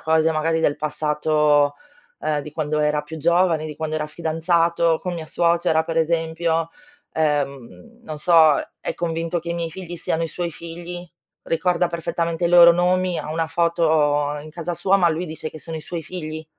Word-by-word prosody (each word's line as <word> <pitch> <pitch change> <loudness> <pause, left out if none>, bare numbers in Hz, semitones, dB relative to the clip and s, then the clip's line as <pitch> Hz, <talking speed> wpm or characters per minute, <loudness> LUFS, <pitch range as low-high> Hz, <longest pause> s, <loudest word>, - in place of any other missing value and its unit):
cose 160 0 +2
magari 160 +1 0
del 145 -3 +1
passato, 150 -1 +1 0.4
uhm, 150 -1 -1
di 150 - -9
quando 155 -1 -1
era 150 0 +1
più 155 +2 -9
giovane, 170 0 +2
di 150 -1 -8
quando 155 0 -3
era 150 -1 -2
fidanzato 165 0 +1
con 180 -1 -4
mia 165 -2 -6
suocera, 170 -1 +1
per 165 0 -2
esempio. 165 0 0 0.4
Ehm, 150 - -2
non 155 -6 -6
so, 160 -2 +5 0.2
è - - -3
convinto 165 0 -2
che 170 +1 -6
i - - -1
miei 170 -1 -3
figli 175 0 -8
siano 165 0 -2
i - - -4
suoi 175 +1 -4
figli, 175 +2 -8 0.4
ricorda 175 +1 +1
perfettamente 170 0 -2
i - - 0
loro 170 0 +8
nomi, 180 +1 +1
ha - - -6
una 165 0 -1
foto 155 -3 +1
in 155 - -11
casa 170 +2 -4
sua, 190 +3 +2
ma 180 -3 +3
lui 165 +3 -3
dice 155 -1 -6
che 155 - -10
sono 165 +1 -6
i - - -6
suoi 170 +1 -5
figli, 160 -1 -6
165 Hz, 185 wpm, -22 LUFS, 155-170 Hz, 0.4 s, loro